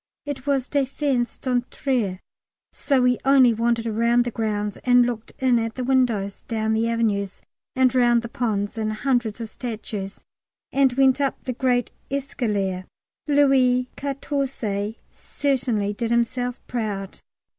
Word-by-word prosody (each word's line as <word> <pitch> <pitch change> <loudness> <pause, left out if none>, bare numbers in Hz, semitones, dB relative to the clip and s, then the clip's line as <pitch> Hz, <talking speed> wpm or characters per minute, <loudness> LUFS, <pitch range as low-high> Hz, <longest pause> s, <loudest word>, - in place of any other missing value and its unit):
It 285 -2 -6
was 275 -2 +1
défense 275 -3 -1
d'entrer, 245 -5 -1 0.5
so 270 -3 +1
we 250 -1 +3
only 270 -3 +6
wandered 230 +1 0
round 235 +2 +2
the 240 - -2
grounds 210 -2 -2
and 245 -1 +5
looked 235 -2 -4
in 255 -2 +3
at 225 0 -3
the 255 - -3
windows, 240 -7 +1
down 220 -1 0
the 225 +1 +1
avenues 205 -4 -1 0.3
and 260 -1 +3
round 240 -2 +4
the - - -4
ponds 220 -2 -2
and 215 0 -1
hundreds 240 -1 0
of 225 -1 -5
statues, 215 -5 -6 0.5
and 275 -1 +3
went 265 +1 +3
up 275 -2 -1
the 255 - -3
great 245 -1 +1 0.2
escalier. 210 -9 -2 0.4
Louis 265 -3 +3
Quatorze 270 -7 -3 0.2
certainly 245 -7 -1
did 230 +2 -3
himself 245 +1 0
proud. 205 -5 -4
240 Hz, 135 wpm, -23 LUFS, 220-260 Hz, 0.5 s, only